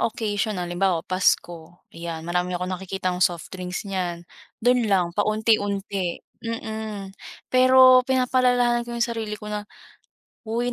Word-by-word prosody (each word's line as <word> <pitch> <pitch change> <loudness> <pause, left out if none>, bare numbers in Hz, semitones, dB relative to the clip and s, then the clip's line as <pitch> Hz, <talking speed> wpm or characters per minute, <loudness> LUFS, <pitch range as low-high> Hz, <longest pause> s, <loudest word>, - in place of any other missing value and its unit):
occasion 215 -2 -1
halimbawa 175 -1 0
Pasko 175 -2 -1
yan, 165 -1 -6
marami 180 +1 -1
akong 180 +1 -3
nakikitang 185 -1 -3
soft 175 0 0
drinks 180 +1 -5
niyan. 180 -3 -3 0.4
Do'n 245 -3 +3
lang 180 -3 +2
paunti-unti, 205 -3 0 0.2
mm, 220 -3 -5 0.4
pero 255 0 +7
pinapaalalahanan 250 -2 +2
ko 235 - -4
yung 235 - +2
sarili 225 -3 -4
ko 210 - -13
na, 210 0 -5 0.8
"hoy 240 +2 -1
200 Hz, 125 wpm, -24 LUFS, 180-230 Hz, 0.8 s, pero